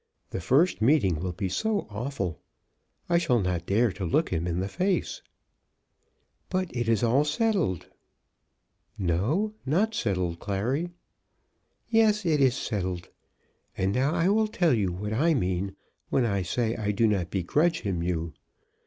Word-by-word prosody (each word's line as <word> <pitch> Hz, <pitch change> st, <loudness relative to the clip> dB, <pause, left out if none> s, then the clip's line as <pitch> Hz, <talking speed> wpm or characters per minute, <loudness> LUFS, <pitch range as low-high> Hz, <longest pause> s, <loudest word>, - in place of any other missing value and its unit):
The 95 Hz, -, -3 dB
first 140 Hz, -, +3 dB
meeting 110 Hz, -, +3 dB
will 90 Hz, +2 st, -2 dB
be 95 Hz, +2 st, -3 dB
so 215 Hz, -, 0 dB
awful. 105 Hz, -, -4 dB, 0.7 s
I 170 Hz, -1 st, +3 dB
shall 145 Hz, -9 st, +2 dB
not 90 Hz, -3 st, -2 dB
dare 110 Hz, +3 st, +3 dB
to 95 Hz, +2 st, -7 dB
look 125 Hz, -, +1 dB
him 85 Hz, 0 st, -1 dB
in 85 Hz, 0 st, -1 dB
the 95 Hz, -, -1 dB
face." 185 Hz, -, -1 dB, 1.3 s
"But 185 Hz, -7 st, -2 dB
it 120 Hz, -1 st, -1 dB
is 115 Hz, -1 st, +2 dB
all 125 Hz, +5 st, +4 dB
settled." 150 Hz, -, 0 dB, 1.1 s
"No; 110 Hz, -, 0 dB
not 195 Hz, +11 st, +1 dB
settled, 90 Hz, -, -1 dB
Clary." 120 Hz, -, -1 dB, 1.0 s
"Yes; 215 Hz, -3 st, +3 dB
it 155 Hz, -4 st, +2 dB
is 130 Hz, -2 st, +4 dB
settled. 95 Hz, -7 st, -3 dB, 0.7 s
And 95 Hz, +1 st, +1 dB
now 135 Hz, +6 st, +1 dB
I 165 Hz, -, +2 dB
will 215 Hz, +2 st, +3 dB
tell 175 Hz, -7 st, +2 dB
you 100 Hz, -6 st, +1 dB
what 105 Hz, +4 st, -4 dB
I 155 Hz, +8 st, +3 dB
mean 95 Hz, -3 st, -1 dB, 0.3 s
when 130 Hz, -, +2 dB
I 100 Hz, -4 st, 0 dB
say 115 Hz, +5 st, -1 dB
I 105 Hz, -2 st, -2 dB
do 105 Hz, +3 st, +2 dB
not 95 Hz, -5 st, +1 dB
begrudge 145 Hz, -, +1 dB
him 95 Hz, -6 st, -2 dB
to 85 Hz, -, -2 dB
you. 85 Hz, -3 st, -2 dB
115 Hz, 155 wpm, -27 LUFS, -, 1.3 s, all